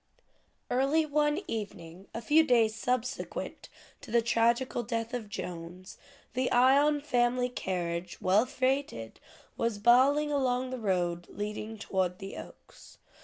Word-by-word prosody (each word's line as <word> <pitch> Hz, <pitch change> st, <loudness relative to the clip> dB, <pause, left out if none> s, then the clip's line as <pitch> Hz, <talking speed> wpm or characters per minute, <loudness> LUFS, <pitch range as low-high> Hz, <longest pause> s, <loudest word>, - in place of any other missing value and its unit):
Early 275 Hz, +5 st, +2 dB
one 295 Hz, +3 st, +1 dB
evening, 195 Hz, -, -6 dB
a 230 Hz, -, -6 dB
few 310 Hz, +7 st, +5 dB
days 235 Hz, -6 st, +3 dB
subsequent 250 Hz, +2 st, -3 dB, 0.3 s
to 285 Hz, -, -12 dB
the 235 Hz, +1 st, +3 dB
tragical 235 Hz, +2 st, +2 dB
death 230 Hz, +1 st, -3 dB
of 230 Hz, -4 st, -4 dB
Jones, 180 Hz, -1 st, -7 dB, 0.3 s
the 255 Hz, 0 st, 0 dB
Ion 280 Hz, +4 st, +4 dB
family 250 Hz, -3 st, +1 dB
carriage, 175 Hz, -6 st, -3 dB
well 205 Hz, +6 st, +3 dB
freighted, 255 Hz, -, -2 dB, 0.4 s
was 230 Hz, -2 st, 0 dB
bowling 265 Hz, +7 st, +4 dB
along 255 Hz, -2 st, 0 dB
the 255 Hz, -, -4 dB
road 175 Hz, -4 st, -1 dB
leading 210 Hz, +1 st, -5 dB
toward 185 Hz, -3 st, -1 dB
the 195 Hz, 0 st, -8 dB
Oaks. -, -, -13 dB
235 Hz, 125 wpm, -30 LUFS, 195-260 Hz, 0.4 s, few